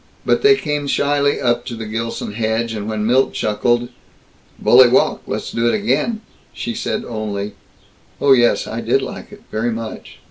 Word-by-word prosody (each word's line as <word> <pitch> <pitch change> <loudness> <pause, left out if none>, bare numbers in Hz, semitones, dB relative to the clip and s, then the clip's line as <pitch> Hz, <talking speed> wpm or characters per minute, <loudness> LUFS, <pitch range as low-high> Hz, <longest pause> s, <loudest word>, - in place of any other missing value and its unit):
But - - +2
they 415 0 +6
came 150 - -3
shyly 145 0 +1
up 120 -1 +1
to 120 - -5
the 110 -1 -6
Gilson 115 0 -4
hedge, 110 +1 -1
and 105 0 -4
when 105 -1 -2
Milt 130 +4 +2
chuckled, 120 +3 0 0.7
"Bully 125 +1 +6
walk; 125 - +2
let's - - -4
do 115 +1 0
it - - +2
again," 220 +1 0 0.3
she 120 - -4
said 115 -1 -3
only, 105 -3 -4 0.7
"Oh, 140 - +3
yes, 120 -3 +4
I - - -5
did - - +1
like - - -8
it. - - -14
Very 115 +2 -1
much." 115 -1 -7
120 Hz, 175 wpm, -19 LUFS, 110-130 Hz, 0.7 s, they